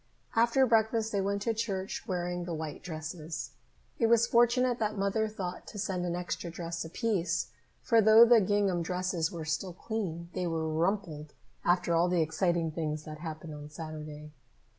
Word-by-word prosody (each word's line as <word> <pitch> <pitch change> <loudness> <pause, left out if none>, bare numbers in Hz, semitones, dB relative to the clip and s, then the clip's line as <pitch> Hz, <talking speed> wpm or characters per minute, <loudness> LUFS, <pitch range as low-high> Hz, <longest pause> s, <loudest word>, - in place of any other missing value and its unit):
After 235 +3 +4
breakfast 225 -1 +2
they 200 - +1
went 200 +1 -1
to 230 - +1
church, 200 -2 -3
wearing 175 -2 -2
the 170 -2 -3
white 155 -1 -5
dresses. 160 -1 -6 0.5
It 230 - +4
was 235 0 +5
fortunate 240 +1 +3
that 215 -1 -1
Mother 200 +3 +1
thought 185 -4 -6
to - - -9
send 185 -2 -2
an 175 - -1
extra 175 0 -4
dress 170 0 -4
apiece, 170 - -1 0.3
for 230 -1 +5
though 220 +2 +8
the 235 -1 +6
gingham 195 -2 +1
dresses 180 -1 -1
were 165 -3 -6
still 165 +4 -2
clean, 175 -5 -4
they 180 - -1
were 160 -1 -1
rumpled 160 -2 -1 0.3
after 175 -1 +2
all 170 +2 +3
the 175 -2 +3
exciting 165 +1 0
things 155 -1 -3
that 155 0 -8
happened 160 -1 -6
on 150 0 -8
Saturday. 150 -1 -8
180 Hz, 170 wpm, -30 LUFS, 160-215 Hz, 0.5 s, though